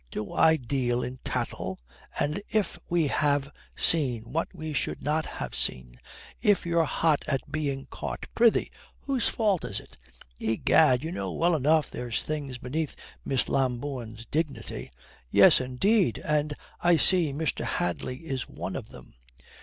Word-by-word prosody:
Do 105 +9 -5
I 160 0 +5
deal 125 -2 -1
in 125 +1 -6
tattle? 115 -6 -3 0.4
And 150 +7 0
if 215 -4 0
we 170 -2 +2
have 145 -1 +1 0.2
seen 130 -9 +4
what 165 +2 0
we 155 -4 -6
should 140 - -2
not 155 +2 0
ha' - - -6
seen, 60 -1 -1 0.4
if 205 -4 +3
you're 170 -1 +2
hot 155 0 +1
at 135 +1 -2
being 140 -3 -2
caught, - - -5
prithee, 230 -1 +3 0.3
whose 270 -3 0
fault 205 -6 +1
is 100 +1 -3
it? - - -16 0.4
Egad, 125 +4 +3
you 160 - -3
know 185 - -3
well 170 0 +2
enough 155 +2 +2
there's 120 -2 -3
things 145 -4 -4
beneath 140 +5 -3 0.3
Miss 135 -2 +1
Lambourne's 125 -3 -2
dignity." 140 -6 -3 0.4
"Yes, - - +7
indeed, 180 - +2
and 150 0 +1 0.2
I 175 -1 +4
see 175 -3 +3
Mr. 155 +3 -2
Hadley 125 - -2
is 135 -5 -3
one - - -5
of - - -6
them." - - -14
145 Hz, 150 wpm, -27 LUFS, 125-160 Hz, 0.4 s, Yes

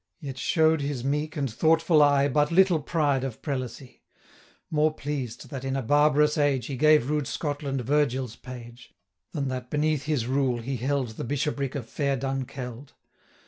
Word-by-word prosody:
Yet 135 -5 -7
show'd 160 +2 +3
his 140 -3 -3
meek 150 +3 -1
and 140 -2 0
thoughtful 160 +6 +3
eye 145 -1 +5
330 140 - -1
But 150 +1 +2
little 180 -1 +4
pride 145 -3 0
of 130 -5 -5
prelacy; 130 -2 -5 0.7
More 155 0 +3
pleased 135 -6 -5
that, 135 -2 -5
in 135 0 -2
a 135 - -1
barbarous 150 +3 +3
age, 140 -4 +2
He 135 - -4
gave 155 -1 +4
rude 150 -3 0
Scotland 145 -3 -3
Virgil's 130 -3 0
page, 120 -2 -11 0.4
Than 140 -2 -2
that 125 -1 -5
beneath 150 -1 0
his 150 -7 0
rule 130 -1 +1
he 135 +2 -3
held 135 +1 -1
The 110 - -7
bishopric 140 +1 -2
of 125 -5 -4
fair 140 +1 -1
Dunkeld. 130 -1 -5
140 Hz, 170 wpm, -26 LUFS, 130-150 Hz, 0.7 s, eye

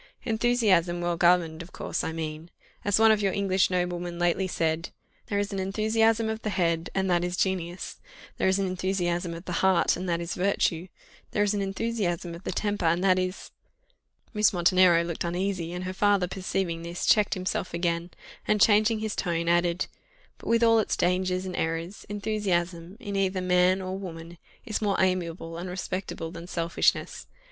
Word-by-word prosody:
"Enthusiasm 220 -7 +2
well 175 0 0
governed, 170 -1 +3
of 170 - -11
course, - - -3
I - - -2
mean 160 0 -5 0.3
as 205 -1 +2
one 220 0 +6
of 215 -1 +2
your 195 -2 +1
English 195 -1 +2
noblemen 175 -1 -2
lately 175 +2 +1
said, 165 -1 -1 0.4
'There 200 - -1
is 205 0 -1
an 195 - -2
enthusiasm 220 +3 +2
of 220 0 -3
the 215 - -2
head, 170 -3 0
and 190 0 +1
that 175 0 +2
is 180 0 -2
genius 180 -2 -2 0.4
there - - +1
is 190 0 +3
an 195 - 0
enthusiasm 180 -2 -1
of 170 +2 -10
the - - -5
heart, 190 -2 +3
and 180 +1 -4
that 170 -1 +1
is 170 0 -4
virtue 180 -2 0 0.5
there 205 - +2
is 205 0 +1
an 205 - -1
enthusiasm 195 -4 -2
of 170 +2 -10
the - - -2
temper, 205 -4 -1
and 170 +2 +2
that 185 -1 +4
is 185 +1 -4 0.4
'" - - -40
Miss 210 -1 +4
Montenero 175 -1 +4
looked 170 -1 -4
uneasy, 175 0 -2
and 180 +1 -5
her 185 0 -4
father 200 -1 +2
perceiving 185 -2 -2
this, 170 +1 -4
checked 210 -1 +4
himself 185 0 -2
again, 170 0 -1 0.4
and, 210 - +2
changing 215 +1 +4
his 220 -1 -2
tone, 170 -2 -1
added, 175 0 +2 0.5
"But - - -11
with 230 0 +3
all 230 -1 +5
its 215 - 0
dangers 185 +1 +1
and 185 -1 -5
errors, 165 +4 -3
enthusiasm, 190 -4 -2
in 205 -5 -5
either 190 -1 +1
man 180 +1 +3
or 185 0 -4
woman, 170 -3 -8 0.3
is 220 -3 -2
more 205 -2 +1
amiable 170 -3 -1
and 180 +1 -5
respectable 180 -2 -4
than 170 0 -9
selfishness. 170 -2 0
185 Hz, 185 wpm, -27 LUFS, 170-200 Hz, 0.5 s, one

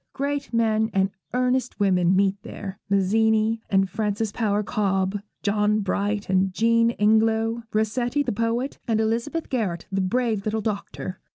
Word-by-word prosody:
Great 280 0 -2
men 220 -1 +2
and 195 0 +2 0.2
earnest 250 -1 0
women 185 -2 +3
meet 195 0 +3
there; 195 -1 -8
Mazzini 220 +3 +2
and 195 -1 +3
Frances 210 +2 -2
Power 210 -1 0
Cobbe, 195 -1 0 0.2
John 210 +1 +2
Bright 205 +1 -1
and 190 0 +2
Jean 230 +4 +3
Ingelow, 220 +2 +2
Rossetti 240 +6 0
the - - -2
poet, 230 +5 -1
and 225 -2 +1
Elizabeth 235 +9 -1
Garrett 205 - -2
the 195 0 0
brave 220 +1 0
little 220 +1 -1
doctor. 200 -3 -4
215 Hz, 145 wpm, -24 LUFS, 200-230 Hz, 0.2 s, women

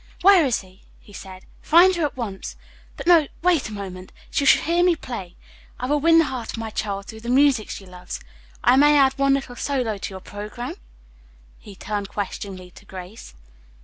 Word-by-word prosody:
"Where 385 -3 +7
is 245 - +1
she?" 185 0 -19 0.2
he 205 - -18
said. 190 -1 -10 0.2
"Find 360 +4 +5
her 340 - -1
at 285 - -5
once. 205 -6 -5 0.4
But, - - -7
no, 335 -4 +5 0.2
wait 345 -10 +2
a - - -10
moment. 190 -3 -8 0.2
She 280 - 0
shall - - +5
hear 340 +2 +2
me 355 -1 +4
play! 195 - -7 0.4
I 250 - -3
will 295 +3 +1
win 330 +2 +5
the 330 - +5
heart 250 -5 -5
of - - -6
my 225 -1 -5
child 200 -2 -3
through 220 - -10
the 235 +2 -7
music 260 -3 +3
she 195 - -7
loves, 180 -1 -8 0.4
I 245 +2 +5
may 295 +1 +6
add 270 -1 +5
one 275 0 +4
little 270 -3 -5
solo 245 -7 -2
to - - -5
your 190 -1 -8
programme?" 210 +5 -7 0.8
he 205 - -13
turned 205 0 -4
questioningly 190 -2 -6
to 200 - -17
Grace. 185 - -10
235 Hz, 200 wpm, -23 LUFS, 195-290 Hz, 0.8 s, Where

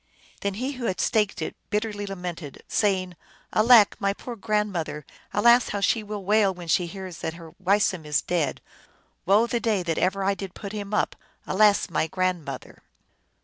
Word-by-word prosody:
Then 200 -1 -2
he 255 +6 -2
who 255 -3 -5
had 185 - -1
staked 210 -3 +1
it, - - -5
bitterly 210 -1 -2
lamented, 180 -6 -6
say 195 -3 +2
ing, 180 -1 -12 0.2
" - - -31
Alack, 220 -1 +6
my 200 0 +1
poor 240 +4 -8
grandmother! 205 -8 -2 0.3
Alas, 235 +3 +5
how 200 - -2
she 220 +3 +2
will 210 -2 -6
wail 210 0 +4
when 175 -2 -9
she 175 +2 +2
hears 185 -1 -8
that 160 - -4
her 165 -1 -11
Weisum 190 -2 +2
is 150 -1 0
dead! 165 -6 -1 0.7
Woe 205 +4 +5
the 235 0 -1
day 215 -5 0
that 165 -2 -1
ever 195 +2 +1
I 200 +1 +2
did 195 -2 -7
put 200 -2 -7
him 205 -1 -5
up! 210 - 0 0.3
Alas, 205 +1 +4
my 160 -2 0
grandmother 175 -6 -3
195 Hz, 185 wpm, -25 LUFS, 180-210 Hz, 0.7 s, Alack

